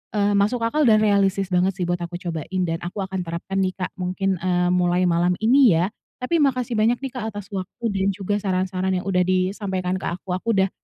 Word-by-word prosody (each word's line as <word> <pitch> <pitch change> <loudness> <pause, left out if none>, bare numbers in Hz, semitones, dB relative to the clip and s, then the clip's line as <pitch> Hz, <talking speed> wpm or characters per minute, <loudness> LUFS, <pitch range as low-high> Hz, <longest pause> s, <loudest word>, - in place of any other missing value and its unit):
eee, 205 0 +2
masuk 230 +4 +1
akal 280 +4 +2
dan 215 -1 +5
realistis 195 -2 +2
banget 180 +1 +2
sih 185 - -3
buat 175 0 -1
aku 175 0 -5
cobain 175 +1 -4
dan 165 -1 -2
aku 180 +4 -4
akan 190 -1 -4
terapkan 170 +3 -4
nih, 185 -1 +1
Kak, 185 -1 -4
mungkin, 185 +1 -1
eee, 180 0 +1
mulai 180 0 +2
malam 175 +1 +2
ini 245 -4 +6
ya. 175 +5 +1 0.3
Tapi 330 +7 +1
makasih 250 -5 +1
banyak 225 +3 +3
nih, 270 - -3
Kak, 240 -4 -4
atas 205 -1 -8
waktu 190 +3 -6
dan 195 -1 0
juga 205 +1 -1
saran-saran 185 -1 -1
yang 180 - -2
sudah 180 -2 +1
disampaikan 185 0 -1
ke - - -7
aku. 185 +1 -9
Aku 185 +5 -3
udah 190 0 +3
190 Hz, 215 wpm, -23 LUFS, 180-205 Hz, 0.3 s, ini